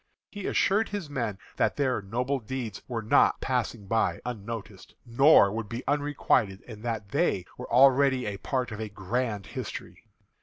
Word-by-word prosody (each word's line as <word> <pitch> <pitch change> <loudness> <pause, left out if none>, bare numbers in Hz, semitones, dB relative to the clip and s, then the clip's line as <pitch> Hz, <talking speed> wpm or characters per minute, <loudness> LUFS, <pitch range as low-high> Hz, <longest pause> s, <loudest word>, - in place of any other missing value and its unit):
He 205 -2 -5
assured 210 +3 +2
his 200 -8 -5
men 115 -8 -2 0.2
that - - +2
their 130 -6 0
noble 125 +7 -1
deeds 115 -3 -5
were 115 -3 -3
not 110 - +4
passing 120 -5 -2
by 110 +3 +1
unnoticed, 110 -4 -7
nor 120 -3 +6
would 110 -1 -4
be 120 +2 -5
unrequited, 140 -8 +1
and 110 -3 -10
that 110 -4 -4
they 90 -2 +1
were - - -9
already 135 0 +5
a 100 -1 -3
part 125 +3 -2
of 110 0 -6
a 110 - -4
grand 105 +2 -2
history. - - -7
120 Hz, 160 wpm, -28 LUFS, 105-135 Hz, 0.2 s, nor